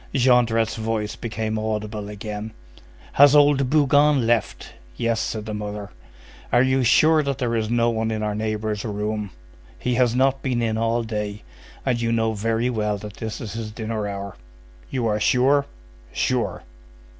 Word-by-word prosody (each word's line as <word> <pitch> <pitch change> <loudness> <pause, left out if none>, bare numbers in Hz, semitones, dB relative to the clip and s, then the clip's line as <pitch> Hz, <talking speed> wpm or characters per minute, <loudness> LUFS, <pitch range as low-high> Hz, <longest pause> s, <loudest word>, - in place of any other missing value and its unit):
Jondrette's 120 -4 +3
voice 110 -1 -2
became 110 -1 -3
audible 105 -1 -3
again:— 105 +1 -6 0.6
"Has 145 +1 +7
old 145 -3 +4
Bougon 145 -2 +4
left?" 115 -3 -1 0.2
"Yes," 115 -1 0
said 110 -1 -3
the 110 - -5
mother. 105 -1 -5 0.6
"Are 120 +1 +5
you 130 0 +2
sure 155 +6 +5
that 140 -3 -2
there 120 -2 -1
is 110 -1 -1
no 120 0 +2
one 110 0 -1
in 110 -1 -2
our 105 -1 -1
neighbor's 110 -1 -2
room?" 105 -1 -3 0.5
"He 125 - -1
has 120 -1 +2
not 135 +1 +2
been 125 -3 -1
in 110 -1 0
all 115 +1 0
day, 105 -2 -4 0.4
and 125 -3 0
you 115 0 0
know 115 -1 +1
very 115 +3 0
well 105 -3 -1
that 105 0 -9
this 110 -1 -5
is 110 - -6
his 115 -1 -5
dinner 110 -1 -4
hour." 100 -1 -6 0.5
"You 130 -3 -2
are 105 -1 +1
sure?" 135 +5 +3 0.4
"Sure." - - -1
115 Hz, 165 wpm, -23 LUFS, 105-125 Hz, 0.6 s, Has